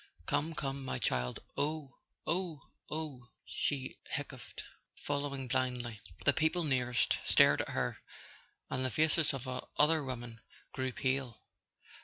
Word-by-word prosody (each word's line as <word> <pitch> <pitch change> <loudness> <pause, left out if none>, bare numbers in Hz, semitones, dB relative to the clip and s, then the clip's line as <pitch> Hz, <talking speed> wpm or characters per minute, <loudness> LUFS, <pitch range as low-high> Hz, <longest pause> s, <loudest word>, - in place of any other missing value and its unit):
"Come, 160 - 0
come, 135 -1 -2
my 130 - -2
child 60 0 0
" - - -33
"Oh—oh—oh," 155 -2 -4 0.2
she 135 -3 -2
hiccoughed, - - -5 0.3
following 140 -2 -2
blindly. 125 -3 0 0.2
The - - +7
people 160 +3 +2
nearest 125 -4 +2
stared - - +6
at - - -5
her, - - -1 0.7
and 130 - 0
the 130 - +2
faces 155 +4 +3
of 135 -1 -5
other 150 +4 +3
women 120 -3 -5 0.3
grew 130 0 -1
pale. 130 -1 -1
135 Hz, 120 wpm, -34 LUFS, 125-150 Hz, 0.7 s, The